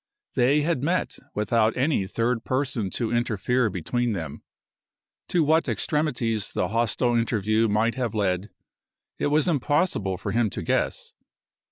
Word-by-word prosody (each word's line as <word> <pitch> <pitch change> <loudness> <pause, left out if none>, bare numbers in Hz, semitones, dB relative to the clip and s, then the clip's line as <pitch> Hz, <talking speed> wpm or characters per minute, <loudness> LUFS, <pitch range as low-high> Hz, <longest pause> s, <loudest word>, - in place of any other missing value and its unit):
They 135 +5 +3
had 160 -4 0
met 175 +6 -1 0.2
without 110 +2 +2
any 130 -7 +1
third 115 +3 -1
person 130 -6 -1
to 115 +3 -2
interfere 120 +1 +1
between 110 +7 -1
them. 85 -5 -5 0.9
To 175 -2 +2
what 160 +2 +2
extremities 120 - -1
the - - 0
hostile 120 +2 +1
interview 115 -1 +1
might 110 +2 +2
have 120 -4 -3
led 95 -1 0 0.7
it - - +1
was 150 +2 +2
impossible 145 - +1
for 100 +2 -4
him 115 0 +2
to - - -5
guess. - - -1
120 Hz, 140 wpm, -25 LUFS, 105-135 Hz, 0.9 s, They